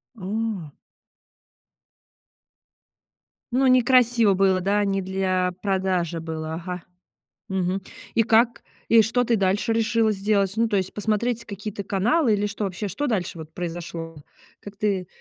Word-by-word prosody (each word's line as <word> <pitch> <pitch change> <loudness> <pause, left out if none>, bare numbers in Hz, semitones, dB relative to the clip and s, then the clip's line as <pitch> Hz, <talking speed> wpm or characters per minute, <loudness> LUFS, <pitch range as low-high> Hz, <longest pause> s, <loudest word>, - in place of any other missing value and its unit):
А. 200 -5 -3 2.8
Ну 265 +2 +3
некрасиво 245 -4 +5
было, 190 -1 +3
да, 205 +2 +1
не 195 -1 0
для 185 -1 0
продажи 185 -4 0
было, 160 0 -5
ага. 180 +1 -6 0.7
Мгм. 190 0 -1 0.3
И 230 - +4
как, 230 +2 +3 0.3
и 230 -1 +7
что 245 +3 +1
ты 235 -1 +2
дальше 195 +3 +1
решила 225 0 +2
сделать? 200 -1 +1
Ну 230 0 +2
то 205 - 0
есть, 190 -1 -1
посмотреть 220 +3 -1
какие-то 205 0 -6
каналы 225 - +2
или 205 0 0
что 205 +1 -4
вообще, 195 +2 -3
что 290 +11 -2
дальше 185 -8 -2
вот 160 0 -10
произошло? 165 -2 -6 0.4
Как 205 0 -11
ты 200 -4 -1
200 Hz, 135 wpm, -24 LUFS, 185-225 Hz, 2.8 s, и